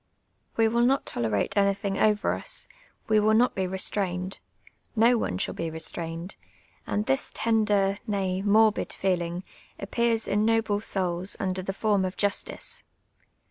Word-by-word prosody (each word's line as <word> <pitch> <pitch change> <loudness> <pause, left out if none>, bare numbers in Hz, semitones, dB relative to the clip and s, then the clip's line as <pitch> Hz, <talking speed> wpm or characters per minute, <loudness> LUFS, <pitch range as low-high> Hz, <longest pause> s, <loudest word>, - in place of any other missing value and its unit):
We 225 -1 +4
will 235 +2 +1
not 265 +3 +3
tolerate 110 -4 -1
anvthinir 200 -1 +1
over 210 -1 +3
us; - - -3 0.4
we 215 -1 +4
will 215 +1 +3
not 245 +3 +4
be 190 -1 -1
restrained, 185 0 -2 0.6
no 235 +2 +5
one 90 - -1
shall - - -1
be 165 - -3
restrained; 165 +2 -4 0.5
and 210 +1 -1
this 135 - 0
tender, 210 -3 +2
nav, 190 -2 -1
morbid 215 +1 +3
feeling, 175 -1 -1 0.4
ap})ears 230 +2 0
in 205 +1 +1
noble 225 -2 +2
souls 185 -2 -1
uniler 185 -1 -1
tlie 195 - -3
form 205 -2 +2
of 185 0 -3
justice. 205 -1 -1
200 Hz, 140 wpm, -27 LUFS, 185-215 Hz, 0.6 s, no